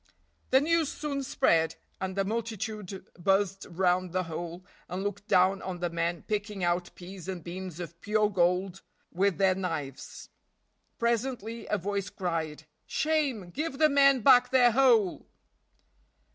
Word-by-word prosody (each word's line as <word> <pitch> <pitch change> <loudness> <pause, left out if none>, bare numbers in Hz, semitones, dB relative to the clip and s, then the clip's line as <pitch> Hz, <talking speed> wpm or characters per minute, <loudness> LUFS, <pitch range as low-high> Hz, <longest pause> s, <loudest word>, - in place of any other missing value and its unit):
The 265 - +6
news 325 0 +2
soon 285 -2 -3
spread, 165 - +2 0.2
and 190 0 -4
a 195 - +1
multitude 215 -3 -4
buzzed 195 +1 +1
round 180 0 +1
the 185 0 +1
hole 170 +2 -6 0.2
and 185 +2 -3
looked 205 +1 -4
down 190 +1 +3
on 185 -1 -5
the 175 -1 -2
men 170 0 -2
picking 205 -2 -3
out 175 0 0
peas 185 0 -10
and 185 -3 -5
beans 180 0 -7
of 170 -1 -8
pure 210 0 +2
gold 180 +1 +1 0.3
with 195 +1 +1
their 190 -1 +4
knives. 160 -8 -5 0.7
Presently 235 -1 -2
a 210 - +1
voice 200 +1 -3
cried, 160 -4 -3 0.2
"Shame, 280 - 0
give 305 - -3
the 310 +1 +5
men 275 -2 +5
back 250 +1 +6
their 250 -2 +5
hole!" 230 -6 +3
195 Hz, 145 wpm, -29 LUFS, 175-230 Hz, 0.7 s, The